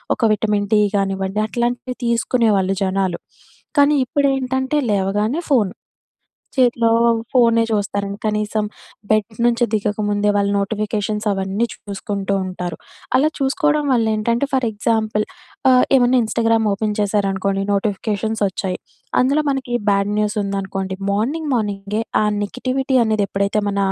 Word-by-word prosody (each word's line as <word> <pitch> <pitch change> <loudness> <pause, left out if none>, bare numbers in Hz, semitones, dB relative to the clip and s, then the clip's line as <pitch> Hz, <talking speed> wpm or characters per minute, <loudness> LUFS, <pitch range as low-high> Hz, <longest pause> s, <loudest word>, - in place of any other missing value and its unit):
ఒక - - -11
vitamin 210 -1 0
D 210 - +5 0.2
గానివ్వండి, 195 +1 -1
అట్లాంటివి 245 +2 -2
తీసుకునేవాళ్ళు 225 -5 +2
జనాలు. 190 -2 0 0.6
కానీ, 285 +1 +5
ఇప్పుడేంటంటే, 270 0 0
లేవగానే 205 - 0
ఫోను. 210 -8 +3 0.8
చేతిలో 240 -3 +3 0.4
ఫోనే 230 -2 +4
చూస్తారండి. 200 -1 -2
కనీసం 210 0 0 0.4
బెడ్ 215 0 +1
నుంచి 240 0 +3
దిగకముందే 210 -1 0
వాళ్ళు 200 0 +1
నోటిఫికేషన్స్ 210 +1 -2
అవన్నీ 195 +3 -1
చూసుకుంటూ 200 -1 -4
ఉంటారు. 180 -2 -5 0.4
అలా 290 +4 +4
చూసుకోవడం 295 +1 +1
వల్ల 230 -3 +2
ఏంటంటే 235 +5 0
ఫర్ 260 -3 +1
ఎగ్జాంపుల్, 215 0 0 0.5
ఆహ్, 250 0 +6
ఏమన్నా 250 0 +4
ఇన్‌స్టాగ్రామ్ 225 0 +1
ఓపెన్ 210 +1 -1
చేశారనుకోండి, 195 -1 0
నోటిఫికేషన్స్ 210 +1 -1
వచ్చాయి. 185 -1 -3 0.4
అందులో 280 +4 +2
మనకి 265 -3 -3 0.2
బ్యాడ్ 200 +1 +1
న్యూస్ 210 0 0
ఉందనుకోండి, 195 -1 -3
మార్నింగ్ 280 +10 -1
మార్నింగే 205 -1 -2 0.2
ఆ - - +2 0.2
నెగటివిటీ 255 +5 -1
అనేది 215 -2 +1
ఎప్పుడైతే 200 +2 0
మన 200 - -2
215 Hz, 120 wpm, -20 LUFS, 200-240 Hz, 0.8 s, ఆహ్